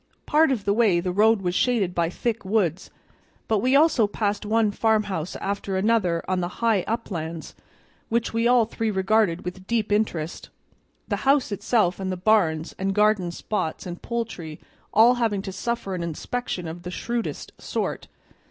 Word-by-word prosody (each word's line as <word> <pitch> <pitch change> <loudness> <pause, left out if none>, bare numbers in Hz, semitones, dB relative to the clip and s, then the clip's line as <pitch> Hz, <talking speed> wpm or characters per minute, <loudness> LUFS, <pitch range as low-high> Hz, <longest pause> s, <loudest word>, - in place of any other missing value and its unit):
Part 305 -1 +4
of 220 -6 -2
the 200 - +2
way 210 -6 +3
the 180 +1 -2
road 210 +2 +3
was 175 -1 0
shaded 205 -4 +1
by 170 -2 +1
thick 230 +4 -2
woods, 190 -3 0 0.6
but 220 -2 +2
we 255 +5 +2
also 280 -7 +4
passed 205 0 -2
one 220 -1 +2
farmhouse 205 -6 0
after 200 -1 -3
another 190 -5 +1
on 185 -1 0
the 175 - -1 0.2
high 225 -4 +3
uplands, 170 -8 -4 0.6
which 230 0 0
we 230 +1 +2
all 245 -2 +5
three 225 0 -2
regarded 190 -3 +1
with 185 +1 -7
deep 225 -3 0
interest, 175 -7 -1 0.6
the - - -1
house 275 -3 +2
itself 205 -2 +1
and 190 -1 -2
the 185 - -3
barns 180 -5 +2
and 195 0 -1
garden 210 -4 +3
spots 170 -1 -3
and 175 -1 -7
poultry 215 -10 -5 0.3
all 230 +4 +6
having 205 -4 0
to 195 - -5
suffer 215 0 -3
an 180 - -3
inspection 175 +3 -4
of 165 +2 -7
the 180 - -6
shrewdest 235 +5 -4
sort. - - -3
205 Hz, 170 wpm, -24 LUFS, 180-225 Hz, 0.6 s, all